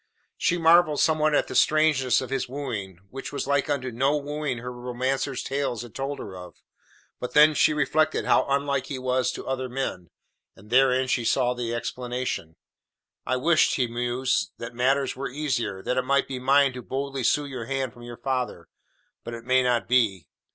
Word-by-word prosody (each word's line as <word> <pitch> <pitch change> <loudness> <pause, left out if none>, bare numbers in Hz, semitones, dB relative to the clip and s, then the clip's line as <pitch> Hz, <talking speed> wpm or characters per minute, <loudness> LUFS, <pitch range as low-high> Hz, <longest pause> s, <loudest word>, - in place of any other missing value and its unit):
She 175 - +1
marvelled 165 -2 +5
somewhat 155 -1 +3
at - - +2
the - - -6
strangeness 150 -6 +3
of 130 - -7
his 135 -2 -2
wooing, 115 -10 -5
which 135 +1 -7
was 140 - -3
like 140 +1 +1
unto 130 -3 -1
no 135 +6 +1
wooing 145 -2 -3
her 125 +1 -6
romancer's 125 +2 -2
tales 135 -4 -2
had 120 - -12
told 140 +1 -3
her 95 - -8
of, 90 -1 -10 0.6
but 125 - -6
then 150 +1 +7
she 150 - +4
reflected 155 +1 +1
how - - +3
unlike 140 -1 0
he 140 - -4
was 130 0 0
to - - -7
other 130 -1 -3
men, 120 - -4 0.5
and 105 +3 -17
therein 130 0 +4
she 125 -2 0
saw 125 +1 +2
the 120 -1 -3
explanation. 125 -8 -4 0.7
"I 130 - +1
wish," 160 +5 +3
he 130 - +1
mused, 120 +2 -1
"that 120 0 -7
matters 135 +2 +1
were 135 +2 -4
easier; 125 -9 -2
that 125 - -1
it - - +3
might 140 +2 +1
be 130 -2 -5
mine 135 +1 +4
to 125 - -7
boldly 135 +1 -4
sue 145 +5 +2
your 130 -5 -6
hand 135 -2 -2
from 120 - -15
your 120 0 -9
father, 125 -10 -3 0.5
but 120 - -6
it 115 0 -10
may 130 +1 +4
not 125 -2 +1
be. 110 -9 +2
130 Hz, 190 wpm, -25 LUFS, 120-140 Hz, 0.7 s, then